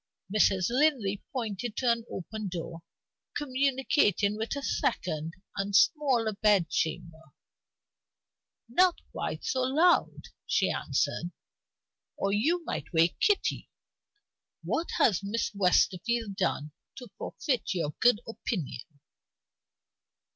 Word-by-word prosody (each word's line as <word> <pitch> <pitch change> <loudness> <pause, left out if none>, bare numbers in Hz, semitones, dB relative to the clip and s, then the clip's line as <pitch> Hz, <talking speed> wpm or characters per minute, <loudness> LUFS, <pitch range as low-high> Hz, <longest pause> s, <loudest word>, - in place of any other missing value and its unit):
Mrs. 195 -2 +3
Linley 245 -8 +2
pointed 230 -2 -4
to 250 -2 +3
an 230 -1 -1
open 215 +3 -5
door, 170 -2 -6 0.6
communicating 260 - +1
with 220 +5 -3
a 280 - -5
second 160 - -1 0.2
and 195 0 -2
smaller 255 -6 +3
bed 200 -5 +3
chamber. 160 0 -2 1.5
"Not 355 +9 +4 0.2
quite - - -4
so 260 - 0
loud," 310 +8 +2 0.2
she - - +2
answered, 175 - -1 0.9
"or 195 - 0
you 325 +11 +1
might - - -4
wake 165 0 +2
Kitty. 415 -2 +1 0.9
What 335 - -1
has 225 - +3
Miss 205 +4 -2
Westerfield 200 +3 +1
done 155 -6 -1 0.2
to 245 -5 -10
forfeit 255 - -2
your 160 -4 -1
good 240 -2 +4
opinion?" 180 - -4
215 Hz, 105 wpm, -29 LUFS, 190-260 Hz, 1.5 s, Not